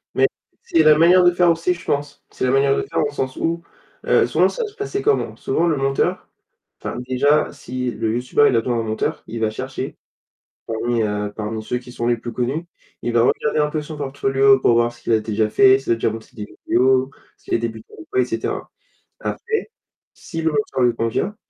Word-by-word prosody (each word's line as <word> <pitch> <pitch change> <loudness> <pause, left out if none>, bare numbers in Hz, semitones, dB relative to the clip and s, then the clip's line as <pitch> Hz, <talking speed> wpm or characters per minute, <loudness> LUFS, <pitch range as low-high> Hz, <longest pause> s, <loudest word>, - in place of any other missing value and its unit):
Mais - - +4 0.4
c'est 165 - +3
la 155 -1 +6
manière 175 +3 +6
de 175 - +6
faire 175 0 +3
aussi, 165 +2 +1
je 170 - -12
pense. 145 0 -2
C'est - - -3
la 125 - +2
manière 135 +1 +3
de - - -1
faire - - -3
au 145 - -2
sens 130 -2 -3
où, 170 +1 -2 0.4
heu, - - +4
souvent, - - +3
ça - - -3
va 435 - -4
se 415 - -21
passer 410 -2 -3
comment? 430 +1 +1
Souvent 170 - 0
le 155 - +1
monteur 135 0 0 0.6
enfin, - - -4
déjà 145 +4 +2
si 125 -2 -4
le 110 0 -2
youtubeur, 125 +4 +3
il - - +2
a - - +5
besoin 120 +1 -1
d'un 115 - -1
monteur, 110 0 -2
il 115 - -5
va 110 - +2
chercher, 130 +3 -5 0.7
parmi 115 +1 -1
heu, 105 -1 -2
parmi 110 0 -4
ceux 125 +3 -2
qui 125 0 -13
sont 120 -1 -3
les 120 - +2
plus 120 +1 -7
connus. 130 +8 -2 0.4
Il 120 - -2
va 115 0 +4
regarder 150 +5 +1
un 150 - +2
peu 155 0 -2
son 155 +1 -8
portfolio 135 -1 +3
pour 120 - +4
voir 120 0 +2
ce 120 - -20
qu'il - - -1
a 110 - +3
déjà 110 0 -1
fait, 130 +3 +6
s'il 135 - -1
a - - +4
déjà 115 - 0
monté 110 0 -8
des 105 -2 -6 0.2
vidéos, 130 +1 +3 0.3
s'il - - -4
est - - +3
débutant 115 -1 -6
ou 105 - -11
quoi, - - +3
et - - +3
cetera. 115 -2 -4 0.5
Après, 445 -3 -3 0.4
si 165 -2 -6
le 160 - +2
monteur 145 -3 -1
lui 120 -1 +3
convient, 115 - -1
130 Hz, 230 wpm, -21 LUFS, 115-150 Hz, 0.7 s, la